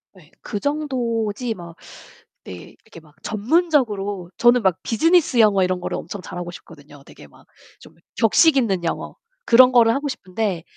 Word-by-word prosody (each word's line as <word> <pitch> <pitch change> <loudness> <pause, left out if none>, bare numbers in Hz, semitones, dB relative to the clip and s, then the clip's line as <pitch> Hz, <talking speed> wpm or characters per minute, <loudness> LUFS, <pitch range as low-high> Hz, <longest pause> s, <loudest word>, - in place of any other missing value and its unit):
네. 170 -3 -20
그 205 - -5
정도지 245 -6 -2
막 170 -4 -12 0.7
네 95 - -8 0.3
이렇게 170 -7 -14
막 150 -1 -24
전문적으로 215 - -1
저는 240 -1 +4
막 185 -2 +1
비즈니스 310 +1 +2
영어 205 -3 +3
이런 180 0 -2
거를 - - -4
엄청 200 - -8
잘 180 - -9
하고 175 0 -6
싶거든요. 145 -4 -15
되게 75 - -16
막 70 - -22 0.4
좀 - - -17 0.2
격식 275 +7 +4
있는 195 -8 0
영어, - - -4 0.3
그런 250 +2 +6
거를 230 -2 +5
하고 285 +3 -3
싶은데 190 -7 -4
215 Hz, 320 characters per minute, -21 LUFS, 180-250 Hz, 0.7 s, 그런